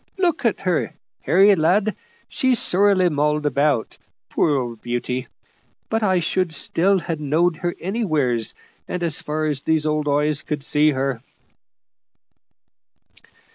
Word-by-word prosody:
Look 345 -7 0
at 230 - +1
her, 180 -4 -1 0.3
Harry, 195 +4 +5
lad. 195 +5 +1 0.3
She's 260 -2 +1
sorely 195 -2 +3
mauled 150 0 0
about, 140 -3 0 0.3
poor 150 - +1
old 120 -3 -5
beauty, 120 +1 -3 0.6
but 225 0 0
I 190 -3 +2
should 175 -1 -1
still 190 +7 +1
ha' 165 -3 -4
knowed 160 +3 +1
her 175 +1 -3
anywheres, 155 - -1 0.3
as 170 -4 0
far 155 +1 -3
as 145 -3 -1
these 160 0 0
old 150 -1 -1
eyes 150 +1 +1
could 150 -3 -4
see 150 +1 +3
her." 135 -4 -2
155 Hz, 130 wpm, -21 LUFS, 145-185 Hz, 0.6 s, Harry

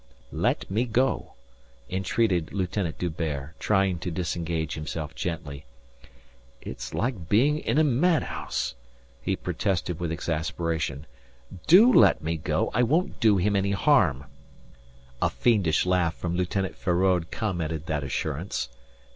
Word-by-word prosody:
"Let - - -1
me 110 +5 +1
go," 125 +3 0 0.5
entreated 95 -1 0
Lieutenant 95 -3 -2
D'Hubert, 80 -4 -3
trying 95 -4 +1
to 90 - -4
disengage 85 -2 -2
himself 75 0 -5
gently. 75 -6 -5 0.9
"It's - - -7
like 110 -9 -2
being 140 +9 +3
in - - -1
a 155 - +5
madhouse," 145 - 0 0.5
he - - -1
protested 90 -3 -2
with 85 -2 -2
exasperation. 80 -3 -2 0.6
"Do 215 +10 +8
let 80 - +5
me 80 +1 -1
go, 75 - -1
I 125 - +2
won't 155 +9 +1
do 110 -4 +4
him 100 +3 +1
any 100 0 +1
harm." 100 - +3 1.0
A - - +3
fiendish 100 -11 +2
laugh 90 -3 +1
from 85 -1 -3
Lieutenant 90 +1 -1
Feraud 90 -1 +1
commented 85 -8 -3
that 75 -3 -2
assurance. 70 +6 -3
90 Hz, 125 wpm, -26 LUFS, 80-105 Hz, 1.0 s, Do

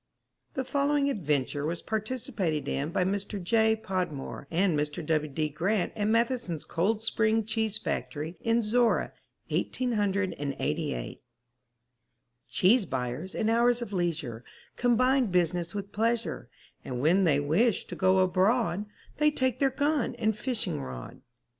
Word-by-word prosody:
The 265 - -1
following 280 +1 +1
adventure 145 - -1
was 165 +3 -3
participated 215 - -2
in 140 +3 -1
by 180 - +1
Mr. 200 +2 -2
J. 220 +4 +3
Podmore 180 -10 -4
and 175 0 +2
Mr. 150 +2 -2
W. 155 -1 0
D. 155 +3 0
Grant 180 +6 0
at 205 - -1
Matheson's 230 - 0
Cold 210 +6 0
Spring 220 0 +2
Cheese 220 -1 -1
Factory 155 +3 -4
in 230 +1 +2
Zorra, 235 +2 +2 0.4
1888. 190 - -1 1.3
Cheese 195 - +4
buyers 130 +8 -3
in 220 - 0
hours 240 +1 +3
of 210 - -8
leisure 165 -10 -2 0.3
Combine 255 +1 +3
business 175 -1 0
with 200 0 -5
pleasure, 230 +2 -1 0.3
And 125 -2 -4
when 170 +8 +4
they 145 -4 +4
wish 180 +10 +2
to - - -7
go 185 0 +3
abroad 195 +2 +2 0.3
They 300 0 +4
take 260 -4 0
their 275 - +4
gun 285 0 0
and 220 -1 0
fishing 235 - -2
rod. 65 -2 -8
200 Hz, 135 wpm, -28 LUFS, 160-230 Hz, 1.3 s, Cheese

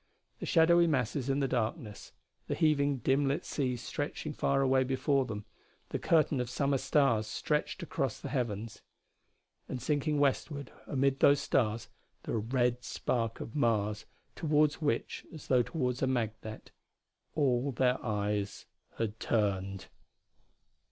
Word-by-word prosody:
The - - -5
shadowy 170 +1 +5
masses 130 -2 0
in 135 +1 +1
the 135 - +2
darkness, 115 -2 -3 0.4
the - - -1
heaving, 145 -3 +2
dim 135 +1 +3
lit 140 +2 -1
sea 130 -4 -1
stretching 145 +5 -4
far 135 -1 +1
away 130 0 +4
before 135 +1 +1
them, 105 -3 -6 0.4
the - - -2
curtain 155 -4 +3
of 125 -1 -2
summer 140 +1 +1
stars 120 -8 +2
stretched 150 +9 -1
across 135 -6 -2
the - - -6
heavens. 115 -5 -3 0.9
And, 130 - -3
sinking 150 +3 0
westward 140 0 0 0.2
amid 135 0 +1
those 140 -1 +6
stars, 115 -3 0 0.4
the - - -3
red 125 +2 0
spark 115 -2 -2
of 115 - -7
Mars 105 -5 +1 0.3
toward 150 -2 +3
which 145 -8 -2
as 155 -3 -10
though 125 -2 +4
toward 125 0 -2
a 130 - +2
magnet 110 -3 -3 0.6
all 135 -2 +2
their 125 +1 +1
eyes 105 -2 -2 0.3
had 110 -1 -2
turned. 100 -3 0
130 Hz, 140 wpm, -31 LUFS, 115-145 Hz, 0.9 s, those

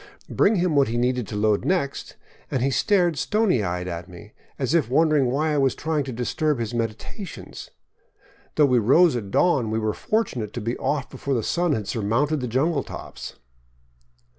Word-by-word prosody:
Bring 215 - +3
him 175 -4 +1
what 140 -1 +4
he 115 +2 -2
needed 125 -2 0
to - - -6
load 105 0 +1
next, 175 -7 -2 0.3
and 130 - -1
he 135 - +1
stared 175 -2 +2
stony 210 - +1
eyed 90 -1 -3
at 85 +1 -6
me, 105 +4 -13 0.2
as 135 +1 -1
if 160 -9 +2
wondering 150 -1 +3
why 150 +5 0
I 145 - +1
was 135 -1 +2
trying 155 -2 -1
to 135 - -5
disturb 140 +5 -1
his 115 -1 -3
meditations. 115 - -6 0.9
Though 150 - +5
we 125 -3 +3
rose 145 +8 +4
at 105 -5 -4
dawn, 130 - +2
we 110 - -1
were 110 -1 0
fortunate 125 - -2
to - - -4
be 115 +2 -2
off 140 -2 -2
before 135 +1 -2
the 115 - -1
sun 175 +3 +1
had 105 -6 -3
surmounted 125 +8 0
the 125 - -3
jungle 140 +6 +1
tree - - -8
tops. - - -9
130 Hz, 190 wpm, -24 LUFS, 115-155 Hz, 0.9 s, Though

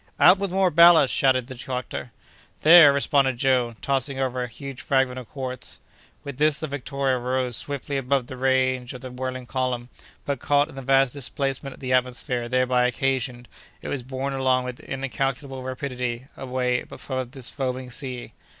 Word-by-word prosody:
"Out 185 +2 +7
with 200 -1 -1
more 190 0 +2
ballast!" 170 -3 +7
shouted 130 -2 +2
the 130 - -8
doctor. 125 -1 -5 0.5
"There!" 160 -2 +9
responded 140 -2 +2
Joe, 125 -2 +1
tossing 135 0 0
over 130 -1 -1
a 125 - -2
huge 135 +2 -8
fragment 130 -2 +1
of 125 - -11
quartz. 130 -2 -6 0.4
With 140 -2 -8
this, 150 -1 +3
the - - -4
Victoria 140 -2 -1
rose 125 0 -1
swiftly 140 +1 -3
above 135 -1 0
the 130 - -8
range 130 -1 +1
of 125 - -9
the 130 - -8
whirling 130 0 -5
column, 125 -1 -2 0.4
but, 140 -3 -2
caught 145 +3 +2
in - - -12
the 135 - -7
vast 135 -1 +3
displacement 135 0 -3
of - - -20
the 130 -1 -1
atmosphere 125 -1 0
thereby 125 0 +2
occasioned, 130 -1 -2 0.4
it - - -5
was 140 - -2
borne 130 +2 -4
along 130 -1 +2
with 125 -1 -6
incalculable 135 +1 -3
rapidity 125 -2 -4
away 125 -1 -1
above 130 -2 -5
this 130 -2 -6
foaming 130 -2 -3
sea. 125 0 -5
130 Hz, 170 wpm, -24 LUFS, 125-140 Hz, 0.5 s, There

